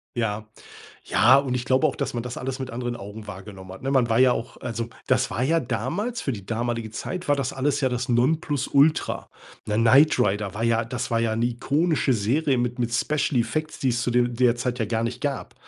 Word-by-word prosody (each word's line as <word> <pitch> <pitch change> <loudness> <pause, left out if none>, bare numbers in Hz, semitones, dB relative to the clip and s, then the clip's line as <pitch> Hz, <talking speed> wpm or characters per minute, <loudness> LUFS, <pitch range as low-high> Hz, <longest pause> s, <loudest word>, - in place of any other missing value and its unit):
Ja, 110 -2 -2 0.6
ja, 125 +4 +5
und 135 -3 -1
ich 120 -1 -2
glaube 130 +3 +3
auch, 145 - -2
dass - - -2
man 120 - -3
das 125 0 -6
alles 130 +1 -4
mit 130 -1 -5
anderen 120 0 -4
Augen 105 +1 -9
wahrgenommen 95 -1 -9
hat, 95 - -11
ne? 135 - -2
Man 125 -4 +2
war 115 - +3
ja 130 -1 +6
auch 115 - -5
also, 115 -1 -4 0.2
das 130 0 +2
war 125 - -2
ja 165 +5 +3
damals 165 - -2
für 135 - -2
die 100 -4 -7
damalige 115 +1 -2
Zeit 180 +9 -5
war 145 - +4
das 135 -2 -2
alles 140 +2 0
ja 135 - +2
das 125 0 -3
Nonplusultra, 145 +3 +1 0.4
ne? 105 0 -1
„Knight 130 +7 +5
Rider“ 100 -1 +1
war 110 - -2
ja 115 0 +2
das 120 0 -4
war 115 0 +2
ja 110 -1 0
'ne 115 +2 +1
ikonische 140 +4 +1
Serie 130 +6 +1
mit 120 0 -1
mit 120 -1 -1
Special 145 +1 +1
Effects, 155 +6 -3
die 135 - 0
es 120 -1 0
zu 125 - 0
de 120 0 +3
der 120 0 +2
Zeit 125 0 -2
ja 115 - +1
gar 110 +1 -1
nicht 120 +2 -4
gab. 140 -2 -3
125 Hz, 230 wpm, -24 LUFS, 115-135 Hz, 0.6 s, ja